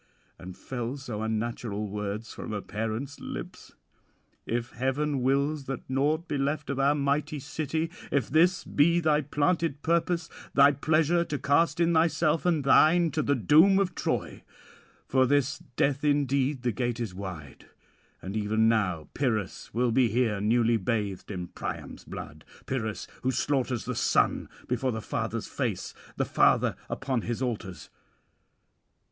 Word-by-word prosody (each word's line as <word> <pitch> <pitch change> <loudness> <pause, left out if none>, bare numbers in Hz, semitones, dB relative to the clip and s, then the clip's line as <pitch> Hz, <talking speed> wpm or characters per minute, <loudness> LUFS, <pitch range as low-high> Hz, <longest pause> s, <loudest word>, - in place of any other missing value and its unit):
and 90 0 -9
fell 125 +1 -4
so 120 -6 -5
unnatural 110 -1 -2
words 105 +2 -4
from - - -6
a 105 - -2
parent's 115 +6 -4
lips? - - -8 0.7
"If 120 +1 -2
heaven 135 +3 -1
wills 140 +3 +1
that 135 0 -5
naught 150 +6 0
be 145 - -2
left 145 +1 -1
of 140 - -3
our 140 +2 +3
mighty 145 +1 0
city, 155 +3 -3 0.2
if 135 -5 +1
this 170 +6 +3
be 170 +4 +3
thy 155 -2 +2
planted 150 +1 0
purpose, 170 0 +1 0.3
thy 140 +1 +7
pleasure 160 +4 +2
to 150 - -3
cast 145 +4 +2
in 170 0 +3
thyself 160 0 +2
and 160 -5 +2
thine 165 +4 +5
to 155 - 0
the 145 -1 +1
doom 155 - +5
of 190 -2 +1
Troy; - - -2 0.6
for 130 0 +3
this 145 +1 +1 0.2
death 140 0 +1
indeed 140 -2 +1
the 125 - +1
gate 120 +1 -2
is 115 -6 -3
wide, 90 -7 -8 0.6
and 95 +2 -5
even 110 +1 +2
now 90 -8 +1
Pyrrhus 110 -8 -2
will 120 +1 +1
be 125 +1 +4
here 110 -3 0
newly 115 +2 +3
bathed 105 -2 -2
in 90 -4 -5
Priam's - - -6
[663 75 +1 -10
695]blood, - - -38
Pyrrhus 110 -5 -3
who 130 - 0
slaughters 130 -2 0
the - - -2
son - - +1 0.2
before 125 +1 0
the 110 - -3
father's - - -3
face, - - -3 0.2
the - - +1
father - - +3
upon 135 -3 -1
his 120 +3 -3
altars. 105 -7 -5
135 Hz, 150 wpm, -28 LUFS, 110-150 Hz, 0.7 s, thy